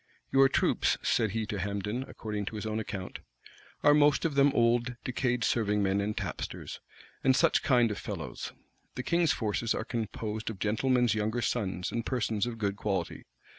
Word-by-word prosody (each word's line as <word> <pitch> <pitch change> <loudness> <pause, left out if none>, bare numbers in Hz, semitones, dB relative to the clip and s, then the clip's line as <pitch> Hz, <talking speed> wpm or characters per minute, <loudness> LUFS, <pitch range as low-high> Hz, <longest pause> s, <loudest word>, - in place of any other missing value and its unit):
"Your 135 0 +6
troops," - - +2
said 110 -3 +2
he 110 +2 -2
to 105 -2 -4
Hambden, 100 +5 -2
according 105 -2 -4
to 110 - -5
his 105 - -4
own 110 0 -1
account,[*] 100 -4 -5 0.6
"are 145 - +7
most 145 0 +4
of 160 - +1
them 140 0 +5
old, 120 0 +2
decayed 125 -2 0
serving 105 -3 +1
men 100 +1 +1
and 105 +1 -2
tapsters, - - -5 0.4
and 130 -1 +4
such 165 +4 +3
kind 120 -5 +3
of 105 - -4
fellows; - - -5 0.4
the 125 - -3
king's 170 0 +2
forces 110 +1 0
are 110 - -3
composed 110 -2 -3
of 110 - -6
gentlemen's 120 +3 +2
younger 110 +3 -1
sons 95 -6 -1
and 115 - -2
persons 115 -3 -1
of 120 -2 -5
good 100 -2 -1
quality. 95 -5 -2
110 Hz, 175 wpm, -30 LUFS, 105-125 Hz, 0.6 s, are